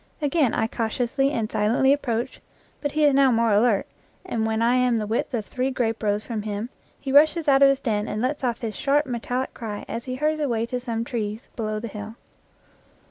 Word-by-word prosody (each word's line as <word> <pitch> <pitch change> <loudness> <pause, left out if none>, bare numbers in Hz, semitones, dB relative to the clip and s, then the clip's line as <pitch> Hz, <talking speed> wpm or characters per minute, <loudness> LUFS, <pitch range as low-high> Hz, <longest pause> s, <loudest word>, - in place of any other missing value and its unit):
Again 290 -4 +1
I - - +1
cautiously 240 +4 0
and 225 -6 -2
silently 240 +6 +3
approach, 240 -5 -2 0.4
but 290 -1 -2
he 305 0 +1
is 290 - +5
now 270 -1 +5
more 230 -1 +2
alert, 210 0 +3 0.4
and 225 -11 -1
when 220 0 0
I 235 +1 +3
am 250 -2 +3
the 215 - -2
width 225 +6 -1
of 220 -3 -3
three 255 +4 -2
grape 230 -4 -1
rows 210 -1 0
from 225 -3 -3
him 210 +3 -4 0.3
he 270 - -4
rushes 310 +3 +5
out 275 -1 +5
of 275 - +8
his 275 -1 +2
den 215 -5 -1
and 210 - -3
lets 265 +5 -1
off 240 0 -1
his 225 -3 -4
sharp, 290 +2 +2
metallic 250 +1 -3
cry 210 -3 -6
as 230 +2 -5
he 255 -1 -4
hurries 305 +3 0
away 235 -6 0
to 250 +1 -3
some 230 -2 -3
trees 220 -2 -4
below 215 -2 -2
the 230 - -5
hill. 210 +1 -8
235 Hz, 215 wpm, -24 LUFS, 220-270 Hz, 0.4 s, of